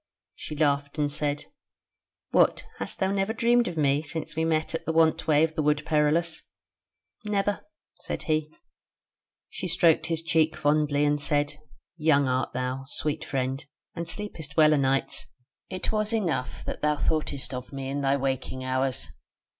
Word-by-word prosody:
She 155 - -7
laughed 145 -1 +1
and 145 -1 +1
said: 145 0 -2 0.9
"What! - - +3
hast - - -4
thou 190 0 +1
never 200 +2 0
dreamed 240 0 +3
of 175 -2 -4
me 145 -1 +3
since 155 0 -4
we 160 - 0
met 160 0 0
at 165 - -3
the - - +2
want 160 -1 +3
way 155 -1 +5
of 160 0 +1
the 155 - -1
Wood 150 0 +2
Perilous?" 160 +2 +1 0.8
"Never," 205 -1 0 0.4
said - - -5
he. 155 -1 0 1.0
She 185 - -5
stroked 170 -2 +3
his 165 -1 -1
cheek 160 -1 +2
fondly, 145 0 +2
and 145 0 +1
said: 145 0 +1 0.4
"Young 150 -3 +3
art 130 -1 0
thou, 130 +1 -3
sweet 150 +1 -2
friend, 135 +1 -2 0.3
and 170 0 -5
sleepest 160 -9 -5
well 155 -1 +7
a - - +3
nights. 135 0 0 0.4
It 185 -1 -3
was 215 +1 0
enough 175 - -1
that - - -5
thou 150 0 +2
thoughtest 145 -3 -1
of 125 0 -6
me 135 -1 -5
in 140 +1 -2
thy 140 0 +2
waking 130 -1 -2
hours." 130 0 0
150 Hz, 165 wpm, -27 LUFS, 140-165 Hz, 1.0 s, well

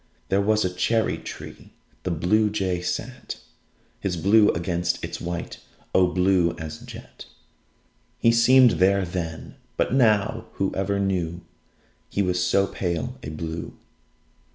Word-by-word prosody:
There 95 +1 +3
was 105 0 +2
a 90 - -2
cherry 110 +5 +1
tree. - - -10 0.3
The - - -3
Bluejay 95 +1 +1
sat 90 - -4 0.6
His 90 -3 -2
blue 105 +5 +5
against 85 +1 -1
its - - -5
white 85 0 -5 0.3
O 90 -1 +5
blue 90 -1 +2
as 80 -2 -7
jet - - -11 0.9
He 115 - +4
seemed 125 +2 +6
there 100 0 +4
then! 85 -2 -5 0.2
But - - +1
now 110 -6 +2
Whoever 95 +1 -1
knew 90 -4 -1 0.7
He 100 - 0
was 90 -1 0
so 100 +1 +3
pale 100 +8 -3
a - - -6
blue! 80 +1 -6
95 Hz, 130 wpm, -24 LUFS, 85-105 Hz, 0.9 s, seemed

